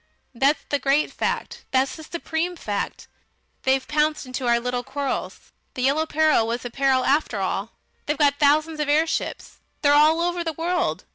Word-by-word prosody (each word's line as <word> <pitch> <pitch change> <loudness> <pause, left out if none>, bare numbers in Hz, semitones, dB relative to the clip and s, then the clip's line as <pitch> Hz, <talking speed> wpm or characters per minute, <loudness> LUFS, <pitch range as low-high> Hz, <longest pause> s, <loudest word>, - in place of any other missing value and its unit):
That's 275 +5 +2
the 285 - +1
great 275 +3 +1
fact. - - -3
That's 265 +1 +1
the 315 - -10
supreme 340 +2 -3
fact. 205 -10 -4 0.5
They've 265 0 +1
pounced 300 0 0
into 255 0 -4
our 235 0 +4
little 245 +1 -2
quarrels.... 270 0 -4 0.2
The 250 - -3
Yellow 295 +4 +2
Peril 310 -8 +3
was 235 +2 -3
a 245 - -5
peril 270 0 +2
after 280 -5 +1
all! 195 +3 -2 0.3
They've 295 0 0
got 285 -1 +3
thousands 305 +2 +3
of 300 -1 -1
airships. 315 +2 -1 0.2
They're 285 0 +5
all 305 +3 +5
over 350 0 -1
the 325 -1 -3
world. 325 - -1
285 Hz, 170 wpm, -23 LUFS, 255-315 Hz, 0.5 s, They're